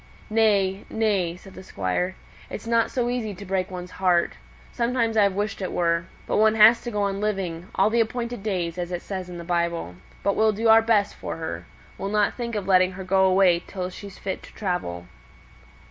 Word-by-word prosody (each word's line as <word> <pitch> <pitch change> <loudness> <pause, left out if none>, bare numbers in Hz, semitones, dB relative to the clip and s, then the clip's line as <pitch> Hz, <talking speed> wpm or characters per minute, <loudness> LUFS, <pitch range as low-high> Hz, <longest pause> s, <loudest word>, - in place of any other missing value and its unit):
"Nay, 205 -3 +2
nay!" 200 -6 0
said 190 +1 -14
the - - -10
Squire. 180 - -2 0.3
"It's 215 - -7
not 230 0 +2
so 245 -2 -1
easy 235 -4 -2
to 200 +3 -9
break 190 0 -1
one's 180 -1 -7
heart. 175 -2 +3 0.4
Sometimes 235 -2 0
I've 200 -3 +3
wished 205 0 -2
it 185 - -3
were. 170 -1 +1 0.2
But - - 0
one 220 +1 +4
has 220 +2 +7
to 240 - -5
go 210 -3 -1
on 200 0 -1
living 190 -5 -2
'all 215 - +3
the 235 0 +3
appointed 235 0 -3
days,' 180 -4 -2
as 175 0 -3
it 175 -1 -4
says 185 -2 -5
in 175 - -7
the 170 - -7
Bible. 170 - -1 0.3
But 200 - +1
we'll 220 0 +3
do 225 +2 +1
our 225 0 +8
best 220 -3 +2
for - - -6
her. 160 -1 -5 0.3
We'll 195 - -3
not 210 0 +2
think 235 -2 -4
of 205 -2 -2
letting 185 -1 +4
her 190 +1 -7
go 190 +1 +3
away 185 -2 +4
till 185 -1 -4
she's 200 +1 -10
fit 190 -2 -4
to - - -14
travel." 175 - -3
195 Hz, 210 wpm, -24 LUFS, 180-220 Hz, 0.4 s, our